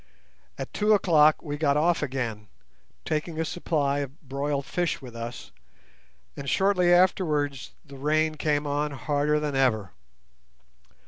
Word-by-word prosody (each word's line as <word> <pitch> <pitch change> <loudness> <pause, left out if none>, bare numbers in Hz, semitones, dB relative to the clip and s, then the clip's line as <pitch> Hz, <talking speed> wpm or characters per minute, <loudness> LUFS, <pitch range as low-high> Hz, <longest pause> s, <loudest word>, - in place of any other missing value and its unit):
At - - -6
two 210 +1 +3
o'clock 155 -6 +4
we 145 -2 -4
got 145 -2 +2
off 170 +3 +2
again, 120 -7 -3 0.6
taking 155 +1 -2
a 160 - 0
supply 145 -4 -1
of 140 +2 -6
broiled 140 +1 -2
fish 175 +2 -1
with 125 -3 -11
us, 115 +1 -7 0.8
and 140 - -5
shortly 190 -2 +3
afterwards 150 -7 +1
the 140 -2 -12
rain 155 +3 +1
came 150 -1 0
on 145 +1 -1
harder 145 +2 0
than 150 -2 -2
ever. 110 -7 +1
150 Hz, 135 wpm, -26 LUFS, 140-160 Hz, 0.8 s, o'clock